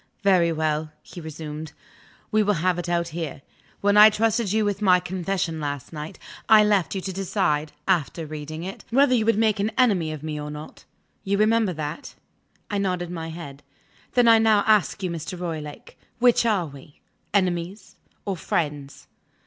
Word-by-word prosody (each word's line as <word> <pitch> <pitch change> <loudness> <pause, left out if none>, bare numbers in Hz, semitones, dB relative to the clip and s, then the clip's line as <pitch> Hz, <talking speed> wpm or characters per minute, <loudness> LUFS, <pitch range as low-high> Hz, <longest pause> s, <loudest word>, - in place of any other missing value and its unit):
"Very 180 -4 +4
well," 155 -1 -1
he 175 - -10
resumed; 155 0 -7 0.6
"we 215 -1 +3
will 205 -1 +2
have 175 +1 0
it 175 0 -4
out, 170 -1 0
here. 160 -4 -6 0.4
When 205 +1 +3
I 210 +1 +10
trusted 220 -1 0
you 215 0 +2
with 205 0 -2
my 180 -3 +5
confession 180 -2 -3
last 145 0 -5
night, 150 0 -7 0.3
I 215 -1 +8
left 205 -4 +1
you 190 - -2
to 190 0 -5
decide 155 -5 -1 0.2
(after 170 -3 0
reading 155 +1 -7
it) 190 +2 -7
whether 265 +2 +4
you 225 -3 +2
would 230 - +3
make 220 -2 +2
an 205 +2 +1
enemy 195 -11 +3
of 155 -1 -7
me 150 -1 -4
or 150 - -6
not. 150 +1 -10 0.4
You 200 +1 0
remember 215 -2 +2
that?" 155 0 -6 0.6
I 205 - 0
nodded 180 -3 -2
my 165 -2 -5
head. 160 -4 -9 0.5
"Then 245 -1 +5
I 225 -1 +7
now 220 -2 +4
ask 210 -3 +2
you, 180 - -1
Mr. 170 +2 -6
Roylake: 155 -4 -7 0.2
Which 240 -1 +4
are 200 -6 +1
we 140 0 -14 0.3
enemies 185 0 -1 0.3
or 195 - -2
friends?" 145 -5 -3
180 Hz, 175 wpm, -24 LUFS, 155-205 Hz, 0.6 s, I